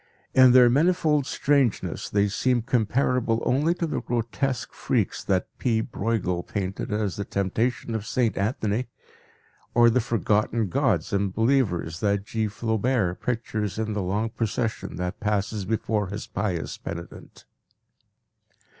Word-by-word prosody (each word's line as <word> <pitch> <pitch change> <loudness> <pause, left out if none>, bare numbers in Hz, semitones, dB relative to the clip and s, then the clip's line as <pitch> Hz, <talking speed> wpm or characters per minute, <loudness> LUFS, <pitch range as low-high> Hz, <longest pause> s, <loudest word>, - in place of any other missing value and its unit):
In 130 -1 +7
their 125 -1 +8
manifold 150 +1 +2
strangeness 140 -5 0
they 100 0 +2
seem 120 +4 +1
comparable 120 0 +1
only 150 +7 +2
to 175 - -1
the 160 - -2
grotesque 120 +3 -2
freaks - - -1
that 95 -2 0
P. 115 -3 +1
Breughel 105 -6 -1
painted 95 +1 -4
as 105 -3 -1
the 100 - -2
temptation 110 +5 -1
of 110 -1 -3
Saint 115 -6 +1
Anthony, 110 +2 -1 0.9
or 120 0 +6
the 125 - +2
forgotten 110 -1 0
gods - - +1
and 100 -1 +1
believers 105 -8 +1
that 100 -1 0
G. 110 0 -1
Flaubert 110 -2 0
pictures 110 -4 -2
in 110 -1 -2
the 105 - -1
long 105 +5 -1
procession 115 +1 -2
that 90 0 -4
passes 105 -1 -1
before 105 -1 -1
his 100 +3 -5
pious 95 -6 -3
penitent. 85 0 -9
110 Hz, 135 wpm, -25 LUFS, 100-125 Hz, 0.9 s, their